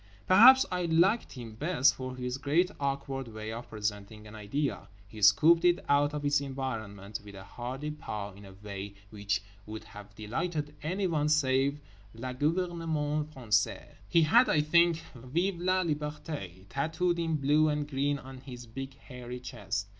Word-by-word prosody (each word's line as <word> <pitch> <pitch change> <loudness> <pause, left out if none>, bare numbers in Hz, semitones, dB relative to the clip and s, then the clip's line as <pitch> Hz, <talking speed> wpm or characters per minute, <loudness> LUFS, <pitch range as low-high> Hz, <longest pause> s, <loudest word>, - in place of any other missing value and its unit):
Perhaps 250 +8 +8
I 180 -1 -1
liked 175 +7 +2
him 120 -4 -8
best 140 +1 +3
for 130 -1 -6
his 125 +1 -4
great 170 +7 +2
awkward 140 -2 -2
way 110 -1 -6
of 115 +2 -7
presenting 105 0 -4
an 105 - -11
idea—he 105 -3 -5
scooped 155 - +6
it 175 0 +3
out 145 +1 +3
of 145 -1 -4
its 145 0 +3
environment 110 -7 -5
with 100 -1 -11
a 95 - -9
hearty 130 +8 -5
paw 105 -9 -6
in 100 +1 -14
a 95 - -12
way 100 -1 -6 0.2
which 100 -2 -2 0.2
would 110 0 -7
have 105 -1 -13
delighted 150 +8 -3
anyone 165 -3 0
save 140 -1 +2 0.4
le 125 +3 -5
gouvernement 155 -1 -1
français. 110 -7 0 0.2
He 170 - +5
had, 235 +11 +5
I 150 - +4
think, 170 +1 +3
VIVE 165 +9 -2
LA 185 +1 +2
LIBERTÉ 150 - -4
tattooed 160 - -1
in 165 -1 0
blue 150 +2 +3
and 150 -1 -1
green 145 0 0
on 130 -1 -10
his 125 -2 -10
big 135 +4 -7
hairy 125 -2 -9
chest. 100 -5 -4
135 Hz, 160 wpm, -30 LUFS, 110-155 Hz, 0.4 s, Perhaps